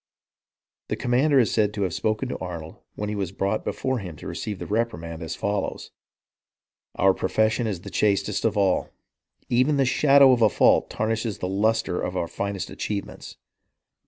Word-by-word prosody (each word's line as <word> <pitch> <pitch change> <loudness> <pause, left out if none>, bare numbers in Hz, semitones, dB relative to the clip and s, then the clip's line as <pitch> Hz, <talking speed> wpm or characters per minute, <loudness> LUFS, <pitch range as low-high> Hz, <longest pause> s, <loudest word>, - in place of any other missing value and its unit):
The - - -2
commander 135 +4 +2
is 120 -4 +4
said 105 -2 +1
to 100 - -1
have 90 -3 -1
spoken 110 +7 -1
to - - -3
Arnold, 85 -3 -7 0.2
when 105 - -4
he - - -2
was 95 -4 -3
brought 100 +2 -1
be - - -1
fore 130 -1 -2
him 90 -5 -7
to - - -12
receive 105 -2 -4
the - - -6
reprimand, 85 -7 -2
as 80 -1 -4
follows: 100 0 -3 0.5
" - - -53
Our 95 0 +4
pro 95 - -3
fession 110 +2 +1
is 95 -5 -3
the - - -9
chastest 105 -1 +1
of 110 -2 +1
all. 95 -2 +2 0.6
Even 130 +5 +2
the 135 - +3
shadow 140 +1 +6
of 125 -2 +2
a 110 - +6
fault - - +3
tarnishes 110 0 -2
the 90 - -3
lustre 105 0 0
of 90 - -3
our 85 - -1
finest 100 +2 -4
achievements. 100 -2 -5
105 Hz, 190 wpm, -24 LUFS, 95-115 Hz, 0.6 s, shadow